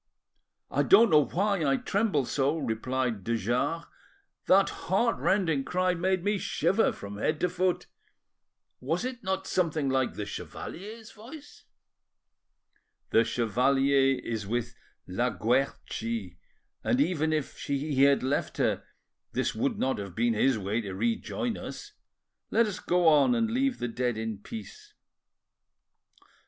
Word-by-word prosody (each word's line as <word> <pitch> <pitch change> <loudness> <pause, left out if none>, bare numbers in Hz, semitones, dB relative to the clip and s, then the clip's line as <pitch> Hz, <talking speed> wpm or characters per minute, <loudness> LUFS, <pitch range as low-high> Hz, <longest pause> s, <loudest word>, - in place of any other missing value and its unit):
"I - - +2
don't 235 - +6
know 150 -2 +6
why 200 -1 0
I 135 -2 +2
tremble 195 - 0
so," 140 +5 0
replied 120 - -2
de 115 +3 0
Jars; 125 - -1 0.6
"that 195 +1 +5 0.2
heart 230 +5 +2
rending 165 -8 +1
cry 185 +3 +1
made 185 +1 0
me 205 0 +1
shiver 210 +4 +1
from 100 0 -8
head 155 +6 0
to 180 - +3
foot. 180 0 0 0.9
Was 165 - -2
it 255 -3 -5
not 190 0 -2
something 160 -7 0
like 130 -1 0
the 105 - -4
chevalier's 215 - -8
voice?" 275 +7 -13 1.5
"The 115 - +5
chevalier 135 +4 +2
is 110 -3 -4
with 120 +2 -2 0.3
La 110 +7 0
Guerchi, 115 -5 -2 0.5
and 125 - +1
even 160 +1 +1
if 155 -3 -2
he 140 -1 0
had 140 -1 +5
left 135 +2 -1
her - - +1 0.5
this - - 0
would - - -1
not 130 -3 0
have 100 -3 -7
been 120 0 +2
his 125 +3 +2
way 105 +3 -1
to 100 -3 -6
rejoin 120 - -2
us. 415 - -8 0.6
Let 230 - +3
us 205 -3 -4
go 175 -1 +2
on 155 - +5
and 230 -1 +1
leave 260 +2 +1
the 120 - -2
dead 120 -1 -1
in 110 -2 -4
peace." 420 - -10
145 Hz, 140 wpm, -28 LUFS, 120-190 Hz, 1.5 s, don't